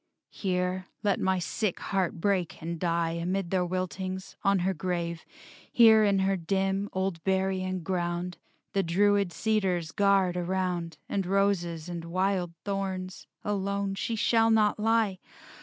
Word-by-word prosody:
Here 185 Hz, -1 st, -1 dB, 0.2 s
let 205 Hz, -2 st, +2 dB
my 190 Hz, 0 st, +1 dB
sick 185 Hz, +2 st, -2 dB
heart 190 Hz, -3 st, -1 dB
break 185 Hz, -2 st, 0 dB
and 170 Hz, 0 st, -4 dB
die 170 Hz, -1 st, +1 dB
Amid 175 Hz, +2 st, -2 dB
their 185 Hz, -2 st, +2 dB
wiltings, 185 Hz, +1 st, -4 dB
on 195 Hz, 0 st, +3 dB
her 190 Hz, -, +2 dB
grave, 170 Hz, -1 st, -3 dB, 0.5 s
Here 220 Hz, -2 st, +7 dB
in 200 Hz, -2 st, +3 dB
her 195 Hz, 0 st, +2 dB
dim, 195 Hz, +3 st, -1 dB
old 190 Hz, -3 st, -2 dB
burying 190 Hz, -1 st, 0 dB
ground 175 Hz, -1 st, -2 dB, 0.3 s
The 195 Hz, -, +2 dB
druid 200 Hz, +2 st, +2 dB
cedars 185 Hz, -6 st, 0 dB
guard 195 Hz, -3 st, +3 dB
around 180 Hz, -1 st, -2 dB
And 195 Hz, -3 st, -1 dB
roses 180 Hz, -4 st, +1 dB
and 170 Hz, -1 st, -5 dB
wild 185 Hz, 0 st, 0 dB
thorns. 190 Hz, -2 st, -3 dB, 0.2 s
Alone 200 Hz, -1 st, -1 dB
She 225 Hz, +4 st, -2 dB
shall 225 Hz, +1 st, +3 dB
not 215 Hz, -2 st, +3 dB
lie! 220 Hz, -3 st, +2 dB
190 Hz, 140 wpm, -28 LUFS, 175-200 Hz, 0.5 s, Here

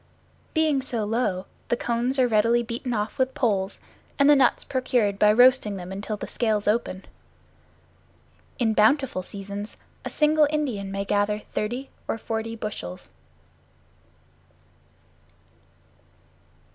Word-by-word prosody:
Being 310 Hz, -4 st, +2 dB
so 235 Hz, -5 st, -2 dB
low, 205 Hz, -4 st, -1 dB, 0.2 s
the 240 Hz, -, +1 dB
cones 240 Hz, +3 st, 0 dB
are 255 Hz, -1 st, +4 dB
readily 230 Hz, +2 st, +3 dB
beaten 235 Hz, +2 st, -4 dB
off 215 Hz, 0 st, -2 dB
with 260 Hz, 0 st, +1 dB
poles, 200 Hz, -6 st, 0 dB, 0.4 s
and 280 Hz, -, +4 dB
the 295 Hz, -, +7 dB
nuts 265 Hz, -3 st, +3 dB
procured 240 Hz, -6 st, 0 dB
by 210 Hz, -, +6 dB
roasting 245 Hz, -2 st, +5 dB
them 180 Hz, -1 st, -7 dB
until 205 Hz, +2 st, -4 dB
the -, -, -5 dB
scales 215 Hz, -3 st, -1 dB
open. 210 Hz, -3 st, 0 dB, 1.5 s
In 225 Hz, -4 st, +1 dB
bountiful 220 Hz, -1 st, +3 dB
seasons 200 Hz, +2 st, -7 dB, 0.3 s
a -, -, -4 dB
single 300 Hz, 0 st, +3 dB
Indian 250 Hz, -11 st, -2 dB
may 195 Hz, 0 st, -3 dB
gather 210 Hz, +1 st, 0 dB
thirty 245 Hz, +6 st, -3 dB, 0.2 s
or -, -, -1 dB
forty 225 Hz, 0 st, -4 dB
bushels. 145 Hz, -, -7 dB
225 Hz, 120 wpm, -25 LUFS, 205-255 Hz, 1.5 s, the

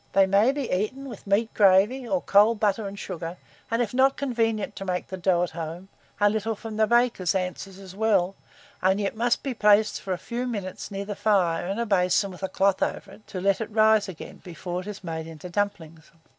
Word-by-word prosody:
They 195 Hz, 0 st, +5 dB
may 200 Hz, +6 st, +4 dB
be 280 Hz, -3 st, -3 dB
eaten 260 Hz, +9 st, -2 dB
with 240 Hz, -, -10 dB
meat 215 Hz, +3 st, +1 dB
gravy, 210 Hz, +6 st, +4 dB
or 190 Hz, -5 st, 0 dB
cold 210 Hz, +2 st, +4 dB
butter 210 Hz, 0 st, +1 dB
and 200 Hz, +1 st, -8 dB
sugar, 175 Hz, -2 st, -6 dB, 0.3 s
and 230 Hz, +1 st, +1 dB
if 220 Hz, -, -6 dB
not 265 Hz, +2 st, +3 dB
convenient 225 Hz, -6 st, -1 dB
to -, -, -5 dB
make 180 Hz, -2 st, -2 dB
the 190 Hz, -, -4 dB
dough 180 Hz, -1 st, +2 dB
at 180 Hz, -, -3 dB
home, 165 Hz, +3 st, -7 dB, 0.3 s
a 205 Hz, -, +5 dB
little 220 Hz, +1 st, 0 dB
from 220 Hz, 0 st, -7 dB
the 220 Hz, 0 st, +3 dB
baker's 235 Hz, -6 st, +2 dB
answers 185 Hz, +1 st, -3 dB
as 190 Hz, -1 st, -11 dB
well, 200 Hz, -4 st, +2 dB, 0.5 s
only 190 Hz, +2 st, +2 dB
it 195 Hz, -, -2 dB
must 240 Hz, +2 st, +1 dB
be 270 Hz, -, -2 dB
placed 210 Hz, -1 st, +3 dB
for 190 Hz, -, -5 dB
a -, -, -3 dB
few 240 Hz, +7 st, -4 dB
minutes 200 Hz, -6 st, -5 dB
near 200 Hz, -1 st, -5 dB
the 205 Hz, 0 st, -5 dB
fire, 180 Hz, -6 st, +1 dB
in 195 Hz, +2 st, -2 dB
a 235 Hz, -, -1 dB
basin 195 Hz, -1 st, +2 dB
with 180 Hz, -, -12 dB
a 190 Hz, -, -2 dB
cloth 195 Hz, -1 st, +1 dB
over 195 Hz, -, -2 dB
it, 215 Hz, -, -16 dB
to 185 Hz, -, -5 dB
let 195 Hz, +3 st, +1 dB
it 220 Hz, -, -4 dB
rise 215 Hz, -1 st, +3 dB
again 175 Hz, -, -9 dB
before 175 Hz, 0 st, -5 dB
it 185 Hz, -, -11 dB
is 205 Hz, -1 st, -7 dB
made 160 Hz, -2 st, -5 dB
into 165 Hz, +2 st, -9 dB
dumplings. 165 Hz, -5 st, -3 dB
200 Hz, 225 wpm, -25 LUFS, 185-220 Hz, 0.5 s, They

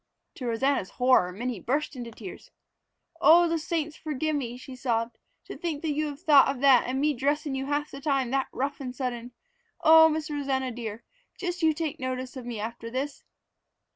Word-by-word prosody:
To 250 Hz, -, -4 dB
Rosanna's 235 Hz, -2 st, 0 dB
horror, 250 Hz, -8 st, +3 dB
Minnie 235 Hz, +3 st, -4 dB
burst 280 Hz, +8 st, -1 dB
into 240 Hz, -2 st, -6 dB
tears. 215 Hz, -5 st, -10 dB, 0.7 s
"Oh, 345 Hz, +2 st, +7 dB
the 330 Hz, 0 st, 0 dB
saints 310 Hz, -1 st, -2 dB
forgive 310 Hz, 0 st, -2 dB
me!" 245 Hz, -4 st, -3 dB
she 260 Hz, 0 st, -10 dB
sobbed. 235 Hz, -2 st, -2 dB, 0.3 s
"To -, -, -8 dB
think 320 Hz, -4 st, -4 dB
you 305 Hz, 0 st, 0 dB
have 290 Hz, +1 st, -7 dB
thought 295 Hz, -6 st, +6 dB
of 275 Hz, -2 st, -2 dB
that 270 Hz, -3 st, +6 dB
and 260 Hz, +1 st, -1 dB
me 300 Hz, +1 st, +2 dB
dressin' 285 Hz, +2 st, -1 dB
you 270 Hz, 0 st, -3 dB
half 290 Hz, +1 st, -1 dB
the 275 Hz, -, -8 dB
time 275 Hz, -4 st, 0 dB
that 270 Hz, 0 st, +1 dB
rough 275 Hz, +2 st, -3 dB
and 255 Hz, -2 st, -6 dB
sudden! 245 Hz, -2 st, -4 dB, 0.5 s
Oh, 320 Hz, 0 st, +8 dB
Miss 310 Hz, 0 st, -3 dB
Rosanna 270 Hz, -3 st, -1 dB
dear, 230 Hz, -1 st, -6 dB, 0.3 s
just 360 Hz, -1 st, -4 dB
you 320 Hz, -1 st, +4 dB
take 315 Hz, -2 st, -3 dB
notice 255 Hz, 0 st, -4 dB
of 250 Hz, -2 st, -7 dB
me 235 Hz, -3 st, -4 dB
after 230 Hz, +2 st, -5 dB
this!" 270 Hz, +4 st, -4 dB
270 Hz, 190 wpm, -27 LUFS, 245-300 Hz, 0.7 s, Oh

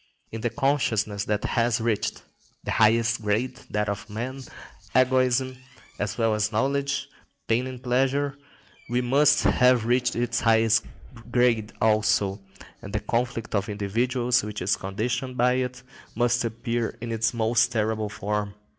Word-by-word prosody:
In 115 Hz, -, -6 dB
the 120 Hz, -, 0 dB
consciousness 115 Hz, -6 st, 0 dB
that 105 Hz, -1 st, -1 dB
has 120 Hz, 0 st, +1 dB
reached 110 Hz, -2 st, -1 dB, 0.4 s
the -, -, -3 dB
highest 115 Hz, +1 st, +3 dB
grade, 120 Hz, +5 st, -1 dB
that 105 Hz, 0 st, -1 dB
of 100 Hz, +1 st, -4 dB
man, 125 Hz, +6 st, -5 dB, 0.5 s
egoism, 130 Hz, 0 st, +2 dB, 0.4 s
as 100 Hz, -2 st, -2 dB
well 115 Hz, -2 st, +2 dB
as 105 Hz, +1 st, 0 dB
knowledge, 140 Hz, +4 st, 0 dB, 0.4 s
pain 120 Hz, +3 st, +1 dB
and 130 Hz, -1 st, -8 dB
pleasure, 135 Hz, +3 st, +1 dB, 0.5 s
must 135 Hz, +5 st, +3 dB
have 125 Hz, -3 st, +4 dB
reached 125 Hz, +1 st, +1 dB
its 120 Hz, 0 st, 0 dB
highest 110 Hz, -1 st, +3 dB, 0.5 s
grade 120 Hz, -3 st, +2 dB
also, 105 Hz, -2 st, +2 dB, 0.4 s
and 100 Hz, -, -9 dB
the 105 Hz, -, 0 dB
conflict 120 Hz, +1 st, -2 dB
of 100 Hz, 0 st, 0 dB
individuals 120 Hz, +4 st, 0 dB
which 105 Hz, -2 st, -5 dB
is 95 Hz, -, +2 dB
conditioned 120 Hz, +6 st, -3 dB
by 125 Hz, +1 st, +3 dB
it 125 Hz, -1 st, -3 dB, 0.3 s
must 120 Hz, +1 st, +2 dB
appear 115 Hz, 0 st, -3 dB
in 115 Hz, 0 st, -5 dB
its 115 Hz, 0 st, +1 dB
most 115 Hz, 0 st, +2 dB
terrible 110 Hz, -2 st, -1 dB
form. 105 Hz, 0 st, -3 dB
115 Hz, 140 wpm, -25 LUFS, 110-125 Hz, 0.5 s, have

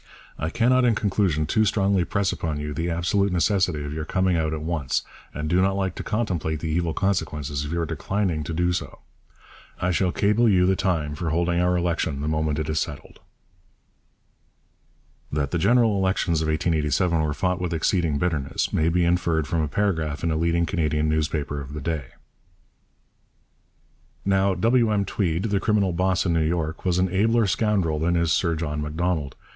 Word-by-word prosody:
I 80 Hz, -, -1 dB
cannot 125 Hz, +6 st, +3 dB
in 120 Hz, -3 st, +3 dB
conclusion 95 Hz, -7 st, +1 dB
too 110 Hz, +8 st, +2 dB
strongly 100 Hz, -3 st, +2 dB
press 100 Hz, +1 st, 0 dB
upon 80 Hz, -3 st, -3 dB
you 75 Hz, 0 st, -4 dB
the 80 Hz, +4 st, -2 dB
absolute 90 Hz, +4 st, +1 dB
necessity 90 Hz, -2 st, +1 dB
of 75 Hz, 0 st, -5 dB
your 80 Hz, 0 st, -3 dB
coming 95 Hz, +3 st, +1 dB
out 80 Hz, -2 st, 0 dB
at 80 Hz, -1 st, -4 dB
once, 80 Hz, -5 st, -1 dB, 0.3 s
and 75 Hz, +2 st, -4 dB
do 90 Hz, +3 st, +2 dB
not 95 Hz, +1 st, +2 dB
like 95 Hz, -2 st, -1 dB
to -, -, -6 dB
contemplate 90 Hz, -8 st, -2 dB
the 80 Hz, -, -4 dB
evil 85 Hz, 0 st, -1 dB
consequences 75 Hz, -7 st, -1 dB
of 75 Hz, -, -5 dB
your 85 Hz, 0 st, -1 dB
declining 85 Hz, +1 st, -2 dB
to -, -, -5 dB
do 90 Hz, +2 st, +1 dB
so. 90 Hz, -, -5 dB, 0.8 s
I 90 Hz, -, 0 dB
shall 90 Hz, +1 st, +1 dB
cable 105 Hz, +5 st, +2 dB
you 90 Hz, -3 st, +4 dB
the 95 Hz, +1 st, +3 dB
time 85 Hz, -6 st, -1 dB
for 80 Hz, +2 st, -3 dB
holding 85 Hz, +2 st, +1 dB
our 90 Hz, 0 st, +2 dB
election 85 Hz, -5 st, -1 dB
the 75 Hz, -, -2 dB
moment 75 Hz, -1 st, 0 dB
it 80 Hz, -, -2 dB
is 80 Hz, -1 st, 0 dB
settled. -, -, -6 dB, 2.1 s
That 70 Hz, -2 st, -1 dB
the 85 Hz, -, 0 dB
general 115 Hz, +3 st, +3 dB
elections 95 Hz, -4 st, +1 dB
of 80 Hz, -, -1 dB
1887 80 Hz, +1 st, +1 dB
were 75 Hz, -2 st, -1 dB
fought 90 Hz, 0 st, -1 dB
with 90 Hz, -1 st, -2 dB
exceeding 85 Hz, -2 st, +1 dB
bitterness 75 Hz, -5 st, -1 dB
may 80 Hz, +1 st, +2 dB
be 85 Hz, +1 st, +2 dB
inferred 85 Hz, -3 st, +1 dB
from 85 Hz, -3 st, 0 dB
a 75 Hz, -, 0 dB
paragraph 80 Hz, -4 st, -1 dB
in 85 Hz, -, +1 dB
a -, -, 0 dB
leading 85 Hz, +1 st, +1 dB
Canadian 75 Hz, -4 st, 0 dB
newspaper 75 Hz, -2 st, -1 dB
of 70 Hz, +1 st, -9 dB
the -, -, -4 dB
day: 80 Hz, -2 st, -2 dB, 2.2 s
Now 95 Hz, 0 st, +2 dB
W. 115 Hz, +4 st, +3 dB
M. 100 Hz, -1 st, +1 dB
Tweed 90 Hz, -3 st, -1 dB
[the 100 Hz, -3 st, 0 dB
criminal 100 Hz, -3 st, +1 dB
'boss' 95 Hz, +2 st, +1 dB
in 85 Hz, -, +1 dB
New 80 Hz, -, +2 dB
York] 80 Hz, +1 st, -2 dB
was 90 Hz, -1 st, +2 dB
an 90 Hz, +1 st, +2 dB
abler 115 Hz, +3 st, +3 dB
scoundrel 100 Hz, -5 st, +1 dB
than 85 Hz, +3 st, +1 dB
is 85 Hz, -1 st, +1 dB
Sir 85 Hz, 0 st, +1 dB
John 75 Hz, -2 st, -3 dB
Macdonald. 75 Hz, -2 st, -2 dB
85 Hz, 185 wpm, -24 LUFS, 80-95 Hz, 2.2 s, you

